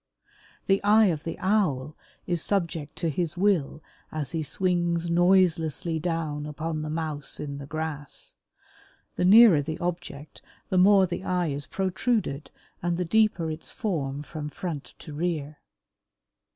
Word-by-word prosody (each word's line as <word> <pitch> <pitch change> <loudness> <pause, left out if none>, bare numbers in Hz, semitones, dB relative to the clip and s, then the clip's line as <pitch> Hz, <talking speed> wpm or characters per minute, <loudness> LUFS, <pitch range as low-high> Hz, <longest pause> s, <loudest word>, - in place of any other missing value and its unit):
The 195 0 +2
eye 215 +2 +6
of 155 -1 -7
the 165 - -4
Owl 155 -8 0 0.3
is 175 -2 0
subject 170 -7 -2
to 165 - -1
his 170 +2 -2
will 180 -6 +1 0.3
as 150 -3 -3
he 165 -1 -2
swings 175 0 0
noiselessly 170 -2 +2
down 155 -3 -2
upon 155 +1 -4
the 155 - -4
Mouse 155 -2 -2
in 140 -1 -5
the 140 - -8
grass. 155 -2 -5 0.8
The - - 0
nearer 205 -5 +8
the 155 +2 -4
object 165 -4 -5 0.3
the 185 - +2
more 195 +1 +6
the 180 +1 -5
eye 180 -3 0
is 140 -1 -4
protruded 190 - -1 0.3
and 175 0 -1
the 180 - -1
deeper 195 -4 +2
its 155 +1 -6
form 145 - -3
from 150 +2 -6
front 155 -2 -6
to 155 - -10
rear. 155 -2 -3
165 Hz, 145 wpm, -26 LUFS, 150-180 Hz, 0.8 s, nearer